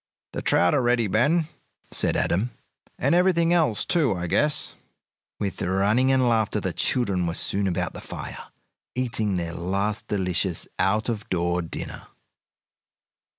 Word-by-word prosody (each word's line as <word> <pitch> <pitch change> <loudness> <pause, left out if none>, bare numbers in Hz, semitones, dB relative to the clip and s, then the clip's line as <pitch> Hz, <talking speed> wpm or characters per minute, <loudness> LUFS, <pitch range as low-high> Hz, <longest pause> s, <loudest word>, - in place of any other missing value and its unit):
"The - - -3
trout 90 0 +3
are - - +3
ready, 120 -1 +2
Ben," 150 - +2 0.4
said - - +3
Adam, 100 +8 +1 0.5
"and - - +1
everything 175 -1 +3
else, 155 -11 +2
too, 150 - +2
I 85 0 -3
guess." 150 - +1 0.7
With 100 -2 -3
running 100 +8 +2
and 130 -2 +3
laughter 110 -2 +1
the 95 -3 -3
children 100 -9 0
were 85 - -2
soon 100 +1 0
about 90 - -1
the - - -8
fire, - - -8 0.5
eating 115 -5 0
their 85 -1 -3
last 100 +5 -2
delicious 90 -3 0
out 105 +4 +2
of 110 -3 -3
door 85 0 0
dinner. 85 - -7
105 Hz, 145 wpm, -25 LUFS, 90-125 Hz, 0.7 s, trout